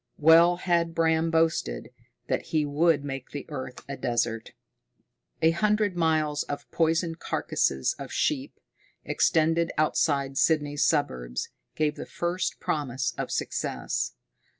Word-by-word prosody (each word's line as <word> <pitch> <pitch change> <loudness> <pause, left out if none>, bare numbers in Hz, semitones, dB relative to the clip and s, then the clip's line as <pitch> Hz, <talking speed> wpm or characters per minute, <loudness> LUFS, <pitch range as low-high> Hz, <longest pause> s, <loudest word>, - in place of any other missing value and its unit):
Well 165 +3 +6
had 170 -2 0
Bram 160 0 +2
boasted 160 - 0 0.4
that - - -1
he 155 -2 +1
would 145 +1 +2
make 135 -2 -6
the 145 - -6
earth 130 -4 -7
a 140 - -4
desert! 120 -3 -2 0.9
A 160 - +6
hundred 210 +2 +1
miles 155 -3 +1
of 145 - -6
poisoned 165 0 +1
carcasses 65 -1 0
of - - -7
sheep, - - -1 0.5
extended 165 +1 +2
outside 140 -3 +1
Sydney's 145 -2 +2
suburbs, 60 - 0 0.3
gave 150 -1 0
the - - -7
first 175 +1 -2
promise 130 -4 -2
of - - -4
success. - - -2
155 Hz, 125 wpm, -27 LUFS, 140-165 Hz, 0.9 s, Well